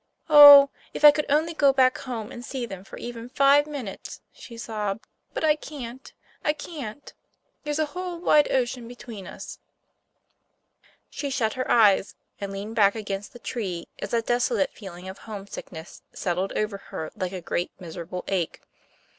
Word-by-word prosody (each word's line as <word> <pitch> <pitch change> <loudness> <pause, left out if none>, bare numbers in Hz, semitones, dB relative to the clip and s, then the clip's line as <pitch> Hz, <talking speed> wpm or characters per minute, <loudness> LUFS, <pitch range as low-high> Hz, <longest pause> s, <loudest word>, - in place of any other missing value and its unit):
Oh, 285 -2 +11 0.2
if 300 - +3
I 295 - +12
could 300 0 -2
only 315 +4 +2
go 285 -3 +4
back 260 -1 +4
home 240 -3 -6
and 240 - -8
see 255 -1 -4
them 195 -4 -9
for - - -11
even 235 0 -7
five 280 +2 +4
minutes," 270 -10 -7
she 235 - -12
sobbed, 215 -3 -4 0.3
"but - - -4
I 305 -1 +4
can't! 265 -4 -9 0.3
I 300 - +2
can't! 290 -5 -8 0.5
There's 295 -1 -2
a 310 - +2
whole 360 -1 -4
wide 300 -4 +4
ocean 245 -2 -1
between 230 -5 -9
us!" - - -9 1.5
She 285 - -4
shut 235 -5 0
her 255 0 -4
eyes, 205 -4 +4 0.2
and 200 -1 -5
leaned 205 +3 -6
back 200 -2 +4
against 205 -2 -5
the - - -10
tree 195 -8 -5
as - - -5
that 230 -1 0
desolate 240 -4 +1
feeling 185 -3 -10
of 190 +1 -8
homesickness 195 -5 -9
settled 185 +2 -2
over 210 -2 -2
her 160 -4 -7
like 185 -1 -3
a 190 - -5
great 175 +1 -2
miserable 175 0 -7
ache. 185 -4 -2
235 Hz, 165 wpm, -25 LUFS, 195-280 Hz, 1.5 s, I